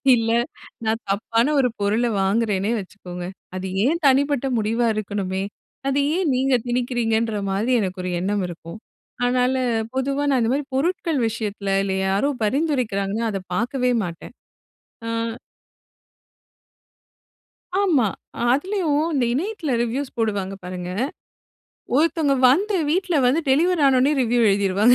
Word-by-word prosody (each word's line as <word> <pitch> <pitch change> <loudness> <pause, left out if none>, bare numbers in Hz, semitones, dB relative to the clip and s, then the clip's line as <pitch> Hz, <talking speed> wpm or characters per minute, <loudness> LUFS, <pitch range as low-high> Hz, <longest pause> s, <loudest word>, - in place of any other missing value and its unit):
இல்ல, 225 -1 0 0.5
நான் 220 +1 0
தப்பான 230 +7 +1
ஒரு 250 -2 +3
பொருள 210 +4 +1 0.2
வாங்குறேனே 205 0 +1
வெச்சுக்கோங்க. 180 -2 -8 0.3
அது 185 +1 -4 0.2
என் 330 +6 +1
தனிப்பட்ட 275 0 +2
முடிவா 225 +2 +1
இருக்கணுமே, 195 -2 -2 0.4
அது 275 +1 +1 0.2
ஏன் 370 -5 +1
நீங்க 265 +1 +1
திணிக்கிறீங்கன்ற 235 -3 0
மாரி 205 +6 0
எனக்கு 185 -2 -3
ஒரு 180 - -2
எண்ணம் 195 +2 0
இருக்கும். 170 +2 -9 0.5
அதனால 250 +1 +2 0.4
பொதுவா 275 +2 0
நான் 265 -3 +3
இந்த 225 - +1
மாரி 285 +1 -1
பொருட்கள் 330 0 0
விஷயத்துல 205 -3 -2
இல்ல 195 -1 -1
யாரோ 200 +9 +1 0.2
பரிந்துரைக்கிறாங்கன்னா, 230 -6 0
அத 195 -2 -3
பாக்கவே 250 +4 0
மாட்டேன். 170 +6 -8 0.7
ஆ - - -2 2.7
ஆமா, 315 - +3 0.5
அதுலயும் 315 0 +1
இந்த 260 -4 +2
இணையத்துல 340 - -2
ரிவ்யூஸ் 255 +4 -3
போடுவாங்க 200 -4 -1
பாருங்க. 180 0 -5 1.1
ஒருத்தங்க 310 -2 +2
வந்து 390 +9 +2
வீட்ல 360 -1 +1
வந்து 285 +7 +3
டெலிவரி 330 +4 +3
ஆன 270 -1 +4
உடனே 280 +4 +3
ரிவ்யூ 240 0 +2
எழுதிருவாங்க. 200 +4 +4
240 Hz, 125 wpm, -22 LUFS, 200-280 Hz, 2.7 s, ஆன